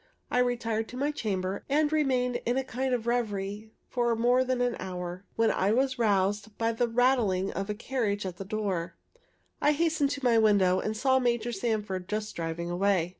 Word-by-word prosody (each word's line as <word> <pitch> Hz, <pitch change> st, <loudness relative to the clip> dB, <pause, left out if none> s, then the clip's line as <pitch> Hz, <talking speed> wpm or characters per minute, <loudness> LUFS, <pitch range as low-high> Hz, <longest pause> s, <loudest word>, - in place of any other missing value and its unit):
I 250 Hz, -, +2 dB
retired 230 Hz, -3 st, 0 dB
to 250 Hz, -, -9 dB
my 285 Hz, +3 st, 0 dB
chamber, 195 Hz, -8 st, -3 dB
and 300 Hz, +2 st, +2 dB
remained 255 Hz, -5 st, +1 dB
in 240 Hz, +2 st, 0 dB
a 265 Hz, -, +1 dB
kind 260 Hz, +1 st, -2 dB
of 230 Hz, -2 st, -4 dB
revery 215 Hz, -3 st, -2 dB, 0.2 s
for 240 Hz, -2 st, +1 dB
more 245 Hz, +3 st, +3 dB
than 255 Hz, -1 st, -1 dB
an 245 Hz, -1 st, +1 dB
hour, 180 Hz, 0 st, -5 dB
when 225 Hz, -1 st, +3 dB
I 190 Hz, -, +1 dB
was 260 Hz, +1 st, +1 dB
roused 205 Hz, 0 st, +1 dB
by 230 Hz, 0 st, +1 dB
the 235 Hz, +1 st, 0 dB
rattling 230 Hz, -6 st, +2 dB
of 195 Hz, +1 st, -4 dB
a 210 Hz, -, -1 dB
carriage 210 Hz, -4 st, -2 dB
at 180 Hz, -2 st, -5 dB
the 195 Hz, -, -5 dB
door. 195 Hz, -4 st, -3 dB, 0.7 s
I 295 Hz, -, +4 dB
hastened 315 Hz, -2 st, +1 dB
to 285 Hz, 0 st, -3 dB
the 240 Hz, -4 st, +3 dB
window, 195 Hz, -4 st, +4 dB
and 215 Hz, +2 st, -3 dB
saw 260 Hz, +2 st, +3 dB
Major 240 Hz, -1 st, 0 dB
Sanford 205 Hz, -4 st, -2 dB
just 215 Hz, 0 st, -3 dB
driving 170 Hz, +1 st, -3 dB
away. 180 Hz, -1 st, +1 dB
225 Hz, 190 wpm, -28 LUFS, 195-250 Hz, 0.7 s, I